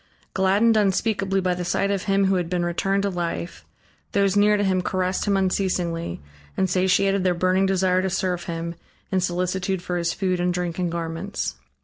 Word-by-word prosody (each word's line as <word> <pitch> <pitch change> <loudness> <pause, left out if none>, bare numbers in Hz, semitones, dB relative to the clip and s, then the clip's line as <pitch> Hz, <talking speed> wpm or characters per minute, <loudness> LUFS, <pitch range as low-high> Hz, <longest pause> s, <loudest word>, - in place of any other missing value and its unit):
Gladdened 200 +4 +3
unspeakably 195 -1 +1
by 180 -1 +1
the 180 0 -4
sight 185 +3 0
of 195 -2 -2
him 195 -1 +2
who 190 - +2
had 175 -3 -1
been 175 -1 0
returned 195 +3 0
to 200 - 0
life, 175 -1 -4 0.5
those 200 -1 +2
near 210 +1 +4
to 205 - 0
him 185 -2 +1
caressed 185 0 -1
him 200 -1 +2
unceasingly, 180 - -1 0.4
and 190 - +2
satiated 190 +1 +2
their 180 -1 +2
burning 185 +2 +2
desire 185 -1 +2
to 190 - -1
serve 180 -2 -1
him, 170 -1 -4 0.4
in 190 - +2
solicitude 180 +1 -1
for 180 -1 -2
his 170 -1 0
food 185 -2 -1
and 175 0 0
drink 175 -1 -3
and 175 -2 0
garments. 165 - -3
185 Hz, 190 wpm, -23 LUFS, 175-195 Hz, 0.5 s, near